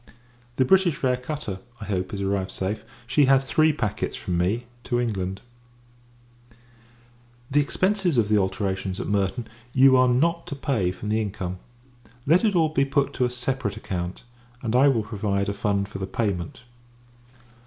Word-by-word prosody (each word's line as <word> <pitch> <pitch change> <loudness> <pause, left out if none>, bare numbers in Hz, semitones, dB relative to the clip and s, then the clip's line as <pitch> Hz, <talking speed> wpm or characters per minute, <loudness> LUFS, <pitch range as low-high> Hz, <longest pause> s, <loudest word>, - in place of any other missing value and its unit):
The 130 - +3
British 185 +1 +4
Fair 130 -2 +1
cutter, 125 -6 -5 0.2
I 105 - -6
hope, 95 -2 -2
is 100 -1 -3
arrived 95 -1 -1
safe. 95 +3 -3 0.2
She 135 +4 +3
has 135 0 +4
three 155 +3 +3
packets, 110 -8 -2
from 95 -6 -3
me, 100 +8 0 0.2
to 120 -1 0
England, 95 -5 -2 2.1
The 145 - +4
expences 185 +1 +1
of 110 -3 +3
the 105 - +2
alterations 95 0 -2
at - - -3
Merton 100 +3 -1 0.3
you 130 0 +6
are 130 0 +5
not 165 +7 +1
to 145 - -4
pay 120 -10 0
from 95 +3 -6
the 110 +1 +1
income. 95 -3 -4 0.7
Let 165 +8 +4
it 210 -4 +2
all 160 -2 +4
be 145 -3 +2
put 140 0 0
to 125 - +1
a - - 0
separate 125 -2 -2
account, 90 -1 -4 0.4
and 115 0 -1
I 135 +3 +6
will 120 -6 +2
provide 100 -2 -1
a - - -1
fund 100 -1 0
for 95 - -8
the 95 - -3
payment. 95 -4 -3
110 Hz, 170 wpm, -25 LUFS, 100-135 Hz, 2.1 s, you